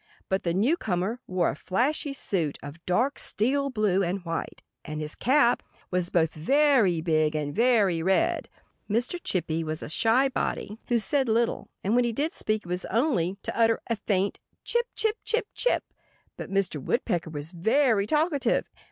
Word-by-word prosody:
But 190 Hz, 0 st, +1 dB
the 170 Hz, -, -1 dB
newcomer 215 Hz, -, 0 dB
wore 185 Hz, -2 st, +1 dB
a -, -, -7 dB
flashy 275 Hz, -, -1 dB
suit 175 Hz, -, -2 dB
of 145 Hz, +4 st, -9 dB
dark 245 Hz, +10 st, +1 dB
steel 275 Hz, +6 st, +1 dB
blue 210 Hz, -6 st, +1 dB
and 185 Hz, 0 st, -2 dB
white; 165 Hz, 0 st, -4 dB, 0.2 s
and 155 Hz, 0 st, -5 dB
his 150 Hz, 0 st, -4 dB
cap 255 Hz, -1 st, +3 dB, 0.3 s
was 180 Hz, -1 st, +1 dB
both 165 Hz, -2 st, +2 dB
very 230 Hz, -, +3 dB
big 155 Hz, -2 st, +1 dB
and 145 Hz, -1 st, -2 dB
very 215 Hz, -7 st, +3 dB
red. 330 Hz, -, +1 dB, 0.4 s
Mr. 240 Hz, -, 0 dB
Chippy 165 Hz, -3 st, -1 dB
was 155 Hz, 0 st, -4 dB
a -, -, -6 dB
shy 230 Hz, -, +3 dB
body 225 Hz, -4 st, -3 dB
who 240 Hz, -, +2 dB
said 265 Hz, +3 st, +1 dB
little; 230 Hz, +1 st, 0 dB
and 200 Hz, -, +1 dB
when 245 Hz, +1 st, +4 dB
he 235 Hz, -1 st, -1 dB
did 295 Hz, +7 st, -1 dB
speak 215 Hz, 0 st, -1 dB
it -, -, -11 dB
was 180 Hz, +1 st, -2 dB
usually 225 Hz, -, 0 dB
only 200 Hz, -, 0 dB
to -, -, -4 dB
utter 230 Hz, -1 st, +3 dB
a -, -, +3 dB
faint 200 Hz, -1 st, -1 dB, 0.2 s
chip, 475 Hz, 0 st, +1 dB
chip, 440 Hz, 0 st, +1 dB
chip, 460 Hz, -1 st, 0 dB
chip. -, -, +1 dB, 0.5 s
But -, -, -7 dB
Mr. 195 Hz, -7 st, -1 dB
Woodpecker 175 Hz, -, -1 dB
was 150 Hz, +1 st, -5 dB
very 220 Hz, +3 st, +2 dB
talkative. 300 Hz, 0 st, +1 dB
210 Hz, 175 wpm, -27 LUFS, 175-260 Hz, 0.5 s, when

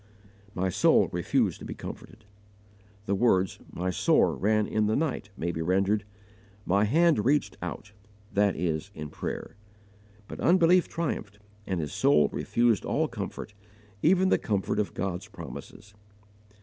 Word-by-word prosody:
"My 95 Hz, +1 st, 0 dB
soul -, -, +4 dB
refused -, -, 0 dB
to -, -, -9 dB
be -, -, -6 dB
comforted." 110 Hz, -, -10 dB, 0.8 s
The 100 Hz, -, 0 dB
words, 95 Hz, -3 st, +2 dB
"my 90 Hz, +1 st, -2 dB
sore 90 Hz, -, +3 dB
ran 105 Hz, +1 st, +2 dB
in 105 Hz, 0 st, 0 dB
the 110 Hz, -, +1 dB
night," 140 Hz, -9 st, -2 dB
may 85 Hz, +1 st, -2 dB
be 80 Hz, -, -4 dB
rendered, 95 Hz, +4 st, +1 dB, 0.6 s
"my 100 Hz, +3 st, +3 dB
hand 155 Hz, 0 st, +3 dB
reached 145 Hz, +3 st, +1 dB
out" 105 Hz, -, -6 dB, 0.4 s
that 100 Hz, -1 st, +2 dB
is 80 Hz, +1 st, -2 dB
in 75 Hz, -1 st, -6 dB
prayer. -, -, -5 dB, 0.7 s
But -, -, -8 dB
unbelief 180 Hz, 0 st, +4 dB
triumphed, 125 Hz, -11 st, -4 dB, 0.3 s
and 95 Hz, -3 st, -1 dB
his 75 Hz, -3 st, -4 dB
soul 75 Hz, -, +4 dB
refused 120 Hz, -4 st, +1 dB
all -, -, 0 dB
comfort -, -, -6 dB, 0.5 s
even 185 Hz, +3 st, +4 dB
the -, -, +3 dB
comfort 100 Hz, -3 st, -1 dB
of 105 Hz, -, -2 dB
God's 95 Hz, +1 st, -3 dB
promises. 100 Hz, 0 st, -10 dB
105 Hz, 145 wpm, -28 LUFS, 95-120 Hz, 0.8 s, soul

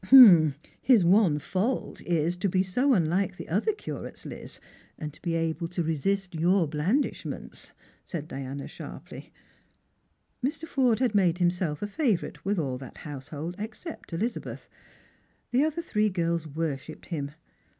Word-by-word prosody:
" 145 Hz, +1 st, -10 dB
His 240 Hz, -8 st, +5 dB
one 180 Hz, -3 st, +5 dB
fault 195 Hz, -, -2 dB
is, 170 Hz, 0 st, +1 dB
to 190 Hz, +2 st, 0 dB
be 185 Hz, +1 st, +2 dB
so 250 Hz, +9 st, +2 dB
unlike 180 Hz, +2 st, +1 dB
the -, -, -7 dB
other 205 Hz, -, +1 dB
curates, 425 Hz, -, -7 dB
Liz, -, -, -8 dB, 0.4 s
and 150 Hz, -2 st, -7 dB
able 165 Hz, -1 st, -1 dB
to 175 Hz, 0 st, -2 dB
resist 185 Hz, +5 st, 0 dB
your 170 Hz, +2 st, +3 dB
blandishments," 170 Hz, -, -2 dB, 0.3 s
said 155 Hz, -4 st, -5 dB
Diana 135 Hz, 0 st, -5 dB
sharply. -, -, -9 dB, 1.1 s
Mr. 310 Hz, +5 st, -2 dB
Forde 255 Hz, -5 st, +2 dB
had 245 Hz, -4 st, +2 dB
made 180 Hz, -4 st, +3 dB
himself 175 Hz, -2 st, 0 dB
a -, -, -1 dB
favourite 210 Hz, -, -1 dB
with 200 Hz, +1 st, 0 dB
all 135 Hz, -6 st, -1 dB
that 130 Hz, -2 st, -10 dB
house 140 Hz, -3 st, -7 dB
hold 160 Hz, +3 st, -5 dB
except 220 Hz, -, -7 dB
Elizabeth. 215 Hz, +9 st, -3 dB, 0.8 s
The 275 Hz, +6 st, +4 dB
three 215 Hz, -10 st, 0 dB
other 210 Hz, -, +2 dB
girls 170 Hz, -2 st, 0 dB
worshipped 155 Hz, -1 st, -4 dB
him. 145 Hz, -4 st, -4 dB
175 Hz, 140 wpm, -28 LUFS, 155-210 Hz, 1.1 s, His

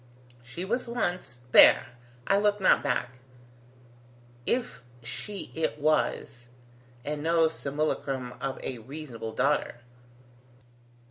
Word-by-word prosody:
She 125 Hz, +10 st, -7 dB
was 240 Hz, +5 st, -2 dB
once... 180 Hz, -, -3 dB
there: -, -, +7 dB, 0.4 s
I 195 Hz, -, +3 dB
look 205 Hz, 0 st, +2 dB
not 190 Hz, -, +4 dB
back 125 Hz, +1 st, -2 dB, 1.3 s
if 245 Hz, -, -1 dB, 0.2 s
she 195 Hz, -, -6 dB
it 160 Hz, -2 st, -1 dB
was, 145 Hz, -5 st, 0 dB, 0.6 s
and 150 Hz, 0 st, -3 dB
no 165 Hz, +1 st, +3 dB
simulacrum 140 Hz, -4 st, -2 dB
of 135 Hz, -1 st, -3 dB
a 125 Hz, -, -4 dB
reasonable 125 Hz, -3 st, -7 dB
daughter. 145 Hz, +4 st, +1 dB
150 Hz, 105 wpm, -28 LUFS, 125-180 Hz, 1.3 s, there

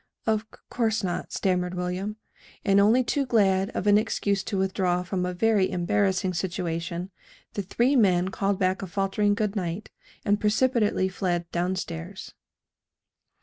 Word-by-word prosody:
"Of 220 Hz, -1 st, +2 dB
c -, -, -16 dB
course 220 Hz, -3 st, 0 dB
not," 180 Hz, -2 st, -3 dB
stammered 180 Hz, -1 st, 0 dB
William. 180 Hz, +4 st, -3 dB, 0.5 s
And 200 Hz, -1 st, +5 dB
only 220 Hz, +6 st, +5 dB
too 275 Hz, +3 st, 0 dB
glad 195 Hz, -6 st, +2 dB
of -, -, -2 dB
an 205 Hz, 0 st, +6 dB
excuse 200 Hz, -2 st, 0 dB
to 200 Hz, -, -2 dB
withdraw 185 Hz, -2 st, 0 dB
from 180 Hz, 0 st, -2 dB
a -, -, -2 dB
very 210 Hz, -1 st, +3 dB
embarrassing 185 Hz, +1 st, +1 dB
situation, 175 Hz, 0 st, -3 dB, 0.4 s
the 205 Hz, -, -2 dB
three 240 Hz, +8 st, +1 dB
men 185 Hz, -6 st, +3 dB
called 195 Hz, 0 st, 0 dB
back 185 Hz, 0 st, 0 dB
a 195 Hz, -, -4 dB
faltering 195 Hz, +2 st, +1 dB
good 210 Hz, -1 st, -1 dB
night, 180 Hz, +1 st, -3 dB, 0.3 s
and 205 Hz, 0 st, +2 dB
precipitately 215 Hz, -2 st, +2 dB
fled 175 Hz, -2 st, -2 dB
down 180 Hz, +2 st, 0 dB
stairs. 175 Hz, +1 st, -6 dB
190 Hz, 150 wpm, -26 LUFS, 180-210 Hz, 0.5 s, an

